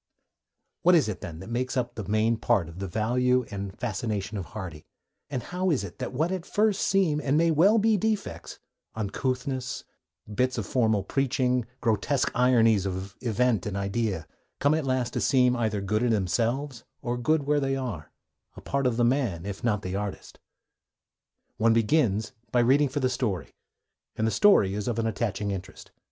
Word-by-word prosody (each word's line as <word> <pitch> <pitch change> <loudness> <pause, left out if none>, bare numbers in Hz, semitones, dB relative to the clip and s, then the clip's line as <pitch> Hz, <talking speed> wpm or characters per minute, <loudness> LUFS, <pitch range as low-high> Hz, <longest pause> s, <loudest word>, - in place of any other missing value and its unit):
What 180 +1 +6
is 160 - +4
it, 105 -4 -4
then, 85 -1 -7
that 95 - -9
makes 130 +3 -1
up 120 -1 -1
the 110 - -5
main 110 +2 +2
part 110 -7 +1
of 85 +3 -10
the 95 - -3
value 125 +5 +1
and 100 -1 -5
fascination 110 -2 -3
of 95 -4 -4
Hardy, 90 -8 -8 0.4
and 130 -4 -3
how 180 +5 -1
is 140 - +1
it 100 - -9
that - - -3
what 155 +7 0
at 185 -3 -2
first 210 +1 +1
seem, 175 -6 +2
and 140 +2 +2
may 165 +1 +3
well 185 +8 +5
be, 220 0 +3
defects, 215 +1 -3 0.4
uncouthnesses, 130 +4 -2 0.5
bits 125 +3 0
of 110 - -2
formal 110 -5 +1
preaching, 125 0 0
grotesque 115 +5 +1
ironies 115 -5 +4
of 95 +1 -5
event 120 -3 +1
and 100 -1 -3
idea, 100 -3 -1 0.3
come 145 +1 +3
at 155 -3 -1
last 130 -2 0
to - - -1
seem 125 -2 +3
either 110 -4 -1
good 105 +3 0
in 125 - +2
themselves 115 +6 0 0.2
or 120 -1 -1
good 145 +5 +1
where 145 +1 +2
they 135 -1 0
are, 120 - -5 0.4
a - - -10
part 140 -1 0
of 120 -2 0
the 120 - +3
man 120 - 0
if 100 -1 -6
not 115 -3 +2
of 100 - -7
the 90 +1 -3
artist? 100 0 -5 1.2
One 115 +1 +4
begins 110 -2 +2 0.2
by 120 - +3
reading 135 +4 +4
for 145 +2 -2
the 130 - +3
story, 115 - -2 0.6
and 110 - 0
the 110 - +1
story 105 - +5
is 105 0 -3
of 120 -2 -1
an 115 - 0
attaching 105 -2 -1
interest. 95 0 -8
120 Hz, 185 wpm, -27 LUFS, 105-135 Hz, 1.2 s, What